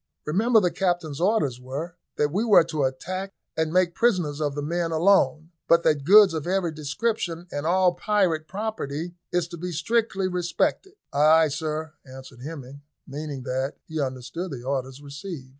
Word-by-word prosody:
"Remember 220 +9 +3
the 180 -4 +1
captain's 175 -6 -1
orders 155 - +1
were, 145 +7 -6 0.2
that 145 0 +1
we 200 +7 0
were 215 -7 +6
to 155 -4 -1
attack 185 +9 -4 0.2
and 160 -1 0
make 180 0 +2
prisoners 175 -11 +1
of 145 -2 -1
the 145 - -3
men 170 +2 -1
alone, 165 -1 +3 0.2
but 170 0 +5
that 145 -3 +2
goods 200 +1 +8
of 160 0 -3
every 185 -2 0
description 165 +3 -2
and 145 +2 -3
all 180 0 +3
private 175 -4 0
property 175 -5 -4 0.2
is 175 -2 0
to 170 - -8
be 180 +2 -5
strictly 195 +3 0
respected." 180 - -1 0.2
"Ay, 155 +3 +5
ay, - - +3
sir," 155 +1 -3
answered 130 -1 -12
Hemming, 140 -2 -8 0.2
meaning 145 -1 -6
that 130 +2 -2
he 160 -1 -3
understood 130 +7 -4
the 130 -6 -7
orders 135 +1 -3
received. 145 -1 -8
160 Hz, 170 wpm, -25 LUFS, 145-185 Hz, 0.2 s, goods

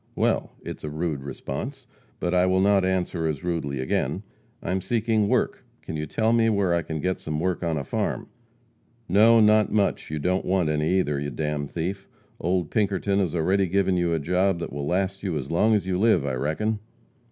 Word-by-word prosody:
"Well, - - 0
it's - - -7
a 75 - -3
rude 75 -2 -2
response, 70 0 -6 0.3
but 90 - -1
I 90 0 +4
will 95 0 +3
not 100 0 +4
answer 90 -3 0
as 75 0 -3
rudely 80 -6 -2
again. 65 - -1 0.4
I - - -2
am 95 0 0
seeking 110 +1 +1
work. - - 0 0.2
Can 80 - -6
you 75 0 -3
tell 110 +8 +1
me 115 -1 +4
where 100 -5 +2
I 85 - +2
can 80 0 -5
get 95 +3 -1
some 75 -1 -3
work 90 +1 -1
on 85 -2 -1
a 70 - -2
farm?" - - -2 0.8
"No, 110 +5 +6
not 110 0 +4
much, 105 -2 0
you 75 - -3
don't 90 +5 0
want 90 -4 +1
any, 75 +4 +1
either, 75 -4 -1
you 70 0 -3
d 65 - -10
d 75 -1 -1
thief. 95 +6 -4 0.3
Old 90 -2 -1
Pinkerton 100 -2 +1
has 90 -4 0
already 95 +4 +2
given 95 +1 +1
you 85 -1 +1
a 80 - +2
job 90 +4 +1
that 85 - -6
will 70 0 -3
last 95 +2 -1
you 90 -6 -2
as 70 +1 -5
long 110 +6 +3
as 100 - 0
you 90 -1 -1
live, 110 -9 +3
I 70 - -1
reckon." 90 +12 -1
90 Hz, 210 wpm, -25 LUFS, 75-100 Hz, 0.8 s, No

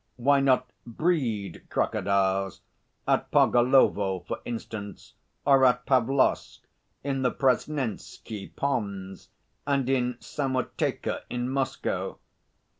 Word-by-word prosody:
Why 140 +3 +3
not 130 -2 +3 0.2
breed 120 - -2
crocodiles 95 -1 0 0.5
at - - +1
Pargolovo, 120 -7 +4
for 90 - -5
instance, 110 -3 -7 0.3
or 135 -1 +5
at 125 -1 +4
Pavlovsk, 130 +1 +1 0.4
in 135 -1 -1
the 125 - +3
Presnensky 125 -6 -2
Ponds 100 -8 -3 0.4
and 140 -3 +1
in 125 -2 +1
Samoteka 130 -3 -2
in 125 0 -2
Moscow? 135 -1 -2
125 Hz, 95 wpm, -27 LUFS, 100-135 Hz, 0.5 s, or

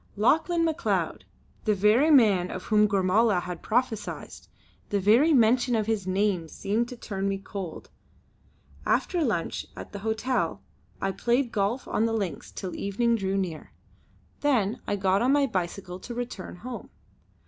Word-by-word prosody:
'" - - -31
Lauchlane 325 - +3
Macleod! 320 -2 -1 0.4
The 215 -2 +3
very 215 +10 +4
man 210 - +5
of 185 - -6
whom 210 -1 +4
Gormala 195 +1 +3
had 180 -1 -6
prophesied! 220 -2 -2 0.6
The 205 - +1
very 230 - +5
mention 245 -1 +4
of 215 -1 +1
his 215 -4 -1
name 190 -3 +1
seemed 215 +8 -1
to 250 - -8
turn 195 -3 -3
me 195 - -1
cold. 195 -3 -7 0.9
After 350 -3 +1
lunch 205 - -2
at - - -9
the 200 - -6
hotel 220 +4 -1 0.4
I 195 - 0
played 240 +4 0
golf 215 +5 -1
on 225 - +1
the 225 - -1
links 200 -6 -3
till 185 -2 -6
evening 230 +4 +1
drew 195 -2 -1
near. 175 -5 -4 0.7
Then 235 -8 +1
I 205 - 0
got 195 0 +2
on 255 +3 +3
my 285 -1 +4
bicycle 185 -3 -4
to 240 - -8
return 240 -8 -5
home. 240 +7 -8
210 Hz, 160 wpm, -27 LUFS, 195-240 Hz, 0.9 s, man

